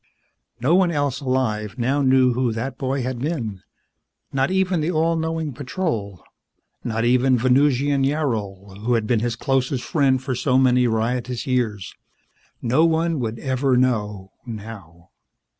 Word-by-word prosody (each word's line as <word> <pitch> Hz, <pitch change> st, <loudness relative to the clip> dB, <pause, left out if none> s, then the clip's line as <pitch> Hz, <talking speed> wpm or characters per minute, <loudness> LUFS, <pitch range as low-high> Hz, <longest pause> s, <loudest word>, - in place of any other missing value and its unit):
No 130 Hz, +7 st, +2 dB
one 185 Hz, -1 st, +4 dB
else 145 Hz, -4 st, -1 dB
alive 125 Hz, -5 st, -1 dB
now 130 Hz, +4 st, +1 dB
knew 130 Hz, -2 st, +4 dB
who 125 Hz, -1 st, 0 dB
that 125 Hz, +4 st, -4 dB
boy 135 Hz, -1 st, -1 dB
had 130 Hz, -1 st, -3 dB
been. 120 Hz, -, -3 dB, 0.7 s
Not 135 Hz, 0 st, +1 dB
even 190 Hz, -2 st, +1 dB
the 155 Hz, -, -1 dB
all 165 Hz, 0 st, +1 dB
knowing 160 Hz, -2 st, -2 dB
Patrol. 120 Hz, -, -4 dB, 0.6 s
Not 115 Hz, 0 st, -1 dB
even 125 Hz, +1 st, +3 dB
Venusian 135 Hz, +3 st, +2 dB
Yarol, 105 Hz, -9 st, -2 dB
who 120 Hz, +3 st, 0 dB
had 115 Hz, -2 st, 0 dB
been 115 Hz, 0 st, +1 dB
his 120 Hz, +1 st, -1 dB
closest 135 Hz, 0 st, -1 dB
friend 140 Hz, -5 st, +2 dB
for 130 Hz, 0 st, -3 dB
so 130 Hz, +1 st, +1 dB
many 125 Hz, -1 st, +4 dB
riotous 120 Hz, +2 st, -1 dB
years. 115 Hz, -7 st, -1 dB, 0.7 s
No 125 Hz, +7 st, +3 dB
one 165 Hz, -1 st, +1 dB
would 115 Hz, -2 st, -3 dB
ever 130 Hz, 0 st, 0 dB
know 105 Hz, -6 st, 0 dB
now. 100 Hz, -7 st, -10 dB
130 Hz, 145 wpm, -22 LUFS, 115-140 Hz, 0.7 s, one